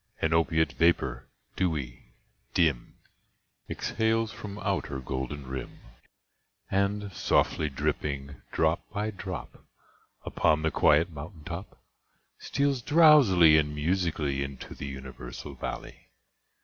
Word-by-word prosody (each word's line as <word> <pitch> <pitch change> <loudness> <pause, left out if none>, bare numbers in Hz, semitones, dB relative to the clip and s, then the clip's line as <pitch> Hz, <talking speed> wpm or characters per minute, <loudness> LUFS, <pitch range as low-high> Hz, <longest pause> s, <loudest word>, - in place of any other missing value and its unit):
An 80 +1 +1
opiate 80 -1 +2
vapour, 65 -7 +1 0.3
dewy, 65 -9 -3 0.4
dim, 80 -8 +1 0.7
Exhales 110 0 0
from 100 -1 -8
out 100 -3 -1
her 70 -2 -5
golden 65 +2 -4
rim, 65 0 -6 0.9
And, 100 0 0
softly 75 -2 +1
dripping, 70 0 -3
drop 80 +1 0
by 105 +1 -2
drop, 95 -3 -7 0.6
Upon 75 0 +2
the 80 - +1
quiet 80 +4 +4
mountain 80 +2 -9
top. 85 +4 -7 0.6
Steals 140 -2 0
drowsily 120 - +7
and 75 -1 -1
musically 75 -3 0
Into 70 -2 -6
the 70 - -7
universal 65 0 -8
valley. 65 - -7
80 Hz, 110 wpm, -28 LUFS, 70-95 Hz, 0.9 s, drowsily